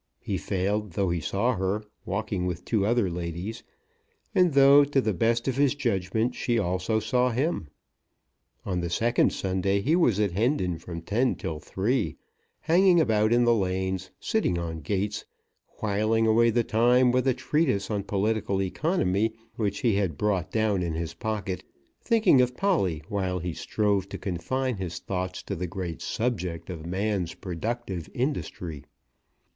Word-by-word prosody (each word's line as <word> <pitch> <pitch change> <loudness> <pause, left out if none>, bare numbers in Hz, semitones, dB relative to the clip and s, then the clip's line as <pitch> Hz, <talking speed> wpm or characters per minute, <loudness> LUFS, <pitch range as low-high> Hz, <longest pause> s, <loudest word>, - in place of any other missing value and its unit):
He - - -3
failed, 100 +1 -1
though 95 -1 0
he 85 - 0
saw 100 +11 0
her, 95 +3 -1 0.2
walking 100 -2 -2
with 90 -1 -4
two 105 -4 +1
other 120 -3 +2
ladies, 85 +5 -4 0.7
and 180 -4 +4
though, 140 +1 +8
to 140 -1 +1
the 110 -5 +1
best 115 +6 +1
of 130 -1 0
his 145 0 +3
judgment, 110 -2 0
she 120 -1 0
also 95 +2 0
saw 125 +4 +1
him. 125 - -1 1.0
On 90 -2 -1
the 85 0 -2
second 115 +7 +2
Sunday 95 +1 0
he 145 +11 +2
was 125 - +3
at 105 -3 +2
Hendon 95 - 0
from 85 -1 -7
ten 120 +8 +1
till 80 -2 -5
three, 105 - -1 0.5
hanging 175 +2 +5
about 110 -6 +3
in 120 +1 +4
the 120 0 +5
lanes, 95 -2 -1
sitting 220 - 0
on 80 -1 -4
gates, 100 +6 -2 0.6
whiling 110 +2 +2
away 115 +1 +4
the 120 +1 +2
time 120 +3 +4
with 130 +1 +1
a 130 - +3
treatise 130 -5 0
on 105 -1 0
political 100 0 0
economy 110 - 0 0.2
which 100 -3 -2
he 115 -5 +2
had 90 -8 -1
brought 95 -2 0
down 110 -2 +1
in 85 -2 -2
his 85 0 -3
pocket, 105 -5 -3 0.4
thinking 220 - +4
of 125 0 0
Polly 95 - +1
while 95 -3 -1
he 90 -1 -3
strove 100 -1 0
to - - -5
confine 110 +8 -2
his 90 -2 -4
thoughts 90 -1 -4
to 100 - -4
the 90 +1 -3
great 90 -2 -5
subject 95 -8 -2
of 80 -2 -7
man's 95 -1 -1
productive 95 0 -4
industry. 90 - -3
105 Hz, 160 wpm, -27 LUFS, 90-120 Hz, 1.0 s, though